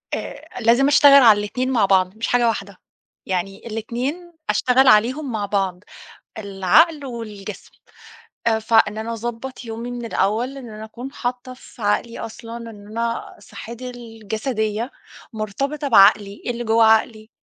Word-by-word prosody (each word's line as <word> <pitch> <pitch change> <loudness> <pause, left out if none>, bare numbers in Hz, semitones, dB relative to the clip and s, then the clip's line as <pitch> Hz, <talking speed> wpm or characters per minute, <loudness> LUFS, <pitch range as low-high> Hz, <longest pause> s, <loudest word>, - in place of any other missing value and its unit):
آآ - - -8
لازم 240 +4 +4
أشتغل 280 -1 +7
على 215 -3 +7
الاتنين 250 +6 -2
مع 225 -6 +3
بعض 190 0 +2
مش 230 - -2
حاجة 245 -1 +2
واحدة، 200 -4 -3 0.5
يعني 190 +4 -4
الاتنين 250 +10 -4 0.2
أشتغل 260 +1 +3
عليهم 250 +6 +3
مع 215 -3 -2
بعض 195 -2 -2 0.5
العقل 220 - +2
والجسم 215 -5 -8 0.8
آآ، 225 -1 +3
فإن 220 -1 +2
أنا 225 +1 -4
أضبّط 240 +3 -6
يومي 230 +2 -6
من 240 -1 -6
الأول، 230 +5 -1
إن 250 -4 -9
أنا 215 0 -8
أكون 245 +5 -9
حاطّة 250 0 -4
في 250 -2 -16
عقلي 210 +3 -1
أصلًا 230 0 -8
إن 205 -1 -14
أنا 230 +2 -4
صحّتي 235 +3 -9
الجسدية 225 0 -4 0.4
مرتبطة 275 +8 -3
بعقلي، 200 -2 +4
اللي 240 0 -2
جوّا 225 0 +4
عقلي. 220 0 +2
230 Hz, 140 wpm, -21 LUFS, 210-250 Hz, 0.8 s, أشتغل